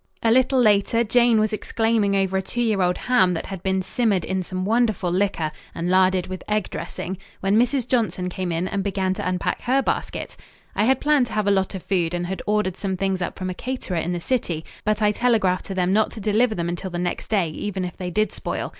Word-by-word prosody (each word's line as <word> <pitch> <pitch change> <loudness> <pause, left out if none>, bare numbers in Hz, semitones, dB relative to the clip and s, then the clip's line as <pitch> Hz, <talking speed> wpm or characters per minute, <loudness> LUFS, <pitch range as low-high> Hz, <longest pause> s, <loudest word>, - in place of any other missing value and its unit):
A 225 - +4
little 260 +2 +4
later 215 0 +4
Jane 235 0 +4
was 215 0 +1
exclaiming 220 -2 +1
over 190 -1 +1
a 190 - +2
two 215 +5 -6
year 215 -4 +1
old 180 0 +2
ham 190 -8 +3
that 165 - -4
had 190 -2 -7
been 190 0 0
simmered 200 -4 0
in 190 0 -1
some 185 +1 -4
wonderful 220 -4 +1
liquor 180 -4 0 0.2
and 170 +2 -1
larded 185 -1 +3
with 185 0 -7
egg 210 -1 0
dressing, 190 +1 -5 0.2
when 195 +2 +2
Mrs. 245 +2 +2
Johnson 190 -7 0
came 180 0 -3
in 170 +2 -1
and 195 0 -2
began 190 -1 0
to 200 0 -4
unpack 180 -1 -1
her 265 +2 +2
basket. - - -3 0.4
I 210 - +2
had 265 +2 +3
planned 295 -4 +3
to - - -9
have 215 -1 0
a 200 - +3
lot 190 0 +1
of 185 - -6
food 175 -3 0
and 175 0 -2
had 190 +2 -4
ordered 210 -3 +1
some 190 -2 -2
things 190 -1 -1
up 175 - -3
from 185 0 -3
a - - -4
caterer 250 -4 -4
in 165 +2 -1
the 175 - -2
city, 170 -7 -2 0.2
but 215 +1 +1
I 210 - +4
telegraphed 210 -6 +1
to 195 - -5
them 185 0 +1
not 215 +1 +3
to - - -8
deliver 215 +3 +2
them 170 -1 -2
until 175 +2 -3
the 175 - -4
next 175 0 -3
day, 195 -7 +1
even 190 +3 -3
if 180 - -6
they 180 -1 -4
did 215 +5 +1
spoil. - - -4
195 Hz, 240 wpm, -23 LUFS, 185-220 Hz, 0.4 s, A